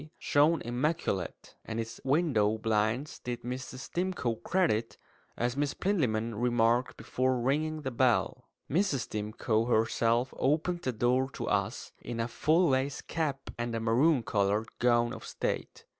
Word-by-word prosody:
(Oxon.)" 155 +1 -13
shone 150 +3 +3
immaculate; 120 - -2
and 110 0 -4
its 115 0 -5
window 130 -8 +2
blinds 110 +5 0
did 120 -1 -5
Mrs. 130 +1 -6
Stimcoe 175 -9 -1
credit, 140 - 0 0.4
as 120 +1 0
Miss 145 0 -1
Plinlimmon 115 - 0
remarked 120 0 +2
before 130 0 0
ringing 155 +5 0
the 130 - -2
bell. 125 0 +1 0.2
Mrs. 160 -5 +1
Stimcoe 110 +1 -1
herself 115 +2 +2
opened 160 +5 +1
the 130 - -1
door 125 +3 +1
to - - -5
us, 100 +3 -1
in 120 -1 -5
a 115 - 0
full 160 +7 +2
lace 135 +1 0
cap 145 -4 -3
and 120 -1 -2
a - - -1
maroon 120 +5 +3
coloured 105 -1 0
gown 120 -1 +3
of - - -8
state. - - -4
125 Hz, 145 wpm, -30 LUFS, 115-145 Hz, 0.4 s, shone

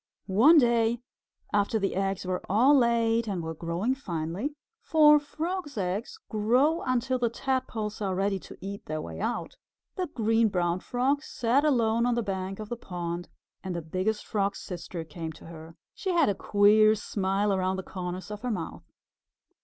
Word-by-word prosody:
One 240 - +6
day, 235 -3 +3 0.5
after 205 +2 +2
the 195 -2 -1
eggs 195 0 -1
were 180 0 -2
all 245 +9 +5
laid 230 -2 +3
and 185 -5 -2
were 160 0 -4
growing 170 +9 -1
finely 195 - -4 0.3
(for 300 -5 +6
Frogs' 315 0 -4
eggs 200 - -2
grow 250 +10 +2
until 255 0 0
the 240 -1 +2
Tadpoles 235 -4 -2
are 190 -2 -1
ready 195 +1 0
to - - -12
eat 200 +1 -7
their 155 0 -2
way - - -7
out), 240 - -3 0.4
the 365 -1 -1
Green 225 -3 +2
Brown 175 -2 0
Frog 260 +7 0
sat 255 -1 +1
alone 235 -5 +2
on 245 - +2
the 235 - 0
bank 190 -1 -3
of 215 -1 -7
the 240 - -2
pond 175 -4 -5 0.3
and 185 -2 -4
the 170 - -2
Biggest 185 +7 -2
Frog's 200 -2 -1
Sister 175 -1 -6
came 160 0 -7
to - - -15
her. 165 0 -11 0.2
She 385 - -4
had 340 - +3
a - - +2
queer 210 +2 +4
smile 200 0 0
around 185 0 0
the 190 - -4
corners 180 +2 -6
of 210 0 -6
her 250 - -2
mouth. 220 - -5
210 Hz, 175 wpm, -28 LUFS, 185-245 Hz, 0.5 s, One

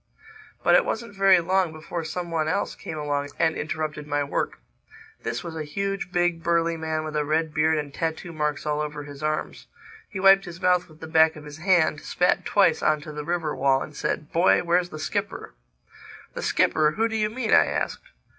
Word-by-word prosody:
But - - +4
it - - +6
wasn't 225 -2 -4
very 195 -2 +5
long 185 0 +1
before 160 +2 -6
some 175 +2 -5
one 160 -2 0
else 200 +6 -1
came 155 - -7
along 145 -1 -2
and 160 -1 +2
interrupted 155 -1 -4
my 145 0 0
work. 140 - -2 0.6
This - - -3
was 170 -2 -7
a 160 - -3
huge, 195 +4 -3
big, 175 -1 +1
burly 170 0 +1
man 160 -1 -2
with 155 0 -5
a 150 - +1
red 155 +1 0
beard 160 0 +2
and 145 -2 -4
tattoo 165 +2 -3
marks 150 -2 -2
all 150 0 0
over 150 -1 -4
his 145 0 -10
arms. 155 0 -3 0.4
He 195 - -6
wiped 195 +1 +6
his 175 -1 -9
mouth 180 -1 +2
with 155 0 -18
the - - -6
back 160 0 +4
of 150 -1 -11
his 150 +1 -10
hand, 170 -4 +2
spat 180 0 +1
twice 190 -6 +3
on 155 -1 +2
to 155 - -8
the 150 0 -6
river 165 -1 -2
wall 135 0 +2
and 150 - -11
said, 150 - -3
"Boy, 175 +1 +4
where's 175 +1 +1
the 155 - -8
skipper?" 155 - -4 0.8
"The - - -5
skipper!—Who 155 +9 +2
do 225 - -4
you 215 -1 +1
mean?" 230 0 -1
I - - +6
asked. - - -3
160 Hz, 205 wpm, -25 LUFS, 150-180 Hz, 0.8 s, it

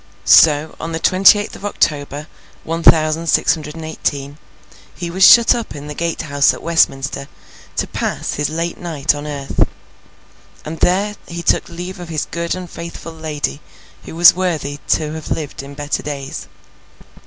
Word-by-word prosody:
So, 155 0 +5
on 165 0 -5
the 160 - -2
twenty 190 +4 +6
eighth 205 +1 -5
of - - -12
October, 150 -7 -1 0.4
one 165 +1 -3
thousand 160 0 +4
six - - +3
hundred 150 -1 -7
and 160 -1 -7
eighteen, 145 -2 -4 0.6
he 175 -1 -5
was 190 +2 +1
shut 235 -1 +8
up 235 -9 -5
in 145 0 -8
the 150 - -6
Gate 165 +1 -3
House 145 -2 +2
at - - -12
Westminster 140 -4 +1 0.5
to - - 0
pass - - -3
his 145 -1 -1
late 165 +2 -3
night 160 -4 0
on 145 0 -6
earth, 140 -2 -1 1.0
and 160 +1 -6
there 200 +3 +1
he 170 0 -6
took - - +1
leave 180 +2 -7
of 175 -1 -8
his 155 -2 -2
good 170 +1 -2
and 185 -1 -7
faithful 170 0 -8
lady 155 -2 -4 0.4
who - - -9
was 170 +1 +8
worthy 160 -6 -2
to 155 -1 0
have 160 -1 -7
lived 150 -4 -4
in 140 +1 -11
better 145 0 -3
days. 140 -2 -6
160 Hz, 175 wpm, -18 LUFS, 145-170 Hz, 1.0 s, shut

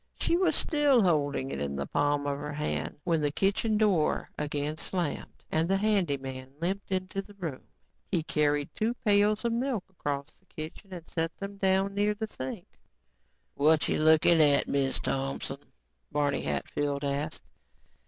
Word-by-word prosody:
She - - +2
was 370 +1 +3
still 290 - +3
holding 145 -6 +1
it 70 - -3
in 70 -1 -2
the 70 0 -2
palm 145 - +1
of 140 0 -1
her 150 0 -5
hand 150 +1 -2
when 165 -2 +1
the 145 -1 +1
kitchen 200 +6 +1
door 200 -8 +2
again 150 +1 -2
slammed 175 -6 -3
and 160 +2 +1
the 195 - +3
handy 195 -8 +2
man 130 -1 -7
limped 195 +4 -2
into 185 +1 -1
the 205 +1 -16
room. 165 -9 -5 0.5
He 175 -5 +1
carried 145 -1 +1
two 230 +3 0
pails 210 +2 +3
of 235 - +1
milk 240 -4 -1
across 145 -4 -3
the - - -32
kitchen 160 +6 -8
and 175 -3 -8
set 165 0 -2
them 200 0 -6
down 195 0 +2
near 205 +1 +1
the 220 +1 -3
sink. 130 -11 -6 0.9
"Whatcha 155 +2 +3
lookin' 160 +1 +5
at, 145 -2 +4
Miz 135 -1 0
Thompson?" 135 0 -3 0.4
Barney 145 -1 +1
Hatfield 140 - -2
asked. 145 +2 -2
160 Hz, 165 wpm, -29 LUFS, 145-200 Hz, 0.9 s, lookin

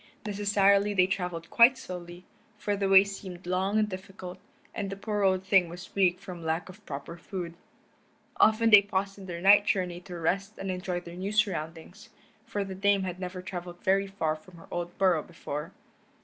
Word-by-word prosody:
Necessarily 205 0 +3
they 185 -1 +5
traveled 180 -3 -3
quite 245 +3 +6
slowly, 175 -2 -8 0.3
for 205 0 -1
the 195 -1 -1
way 195 0 +8
seemed 190 -3 -8
long 190 +3 0
and 215 -1 +3
difficult, 185 -1 -8 0.3
and 200 -1 -3
the 195 - -4
poor 210 +1 -3
old 190 -1 +2
thing 190 -2 +4
was 175 +1 -10
weak 185 -2 +3
from 180 -3 -9
lack 160 +3 -2
of 200 +3 -13
proper 145 +4 -6
food. 175 -1 -6 0.8
Often 225 +1 +4
they 210 -1 +10
paused 195 0 -3
in 190 - -10
their 170 -1 -5
night 205 +2 +6
journey 180 -2 0
to 175 -1 -8
rest 195 +6 -1
and 195 -1 -3
enjoy 180 -1 -3
their 170 -1 -10
new 190 +3 -4
surroundings, 180 -1 -2 0.4
for 205 - -2
the 195 -1 -6
Dame 200 +1 +2
had 180 -1 -4
never 180 0 -6
traveled 175 -1 -7
very 195 +1 +2
far 165 -6 -1
from 170 +3 -16
her 165 - -14
old 175 0 -4
burrow 185 -5 +3
before. 150 +4 -6
190 Hz, 190 wpm, -28 LUFS, 175-200 Hz, 0.8 s, they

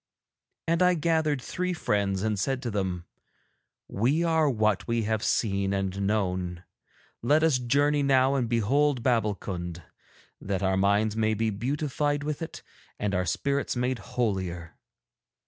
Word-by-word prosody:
And 165 +2 +1
I 180 0 +5
gathered 160 -3 +1
three 180 +8 -3
friends 100 - 0
and 110 -2 0
said 135 +3 -1
to 120 - -2
them: 95 -4 -2 0.8
'We 135 +11 +1
are 160 -3 +3
what 110 -5 +1
we 115 -1 0
have 110 0 -1
seen 100 -3 0
and 95 0 -2
known. 90 -4 -1 0.6
Let 150 +6 +3
us 155 -6 +3
journey 145 +4 +2
now 135 -1 +3
and 125 -4 0
behold 125 +4 +2
Babbulkund, 100 -8 -1 0.6
that 95 -1 -2
our 95 0 +2
minds 100 +2 +2
may 110 -1 +1
be 110 +1 0
beautified 145 +5 -1
with 150 +1 -3
it 165 - -7 0.3
and 105 -1 -2
our 90 -1 0
spirits 140 - -1
made 125 0 -1
holier.' 95 -9 -3
115 Hz, 145 wpm, -27 LUFS, 100-140 Hz, 0.8 s, I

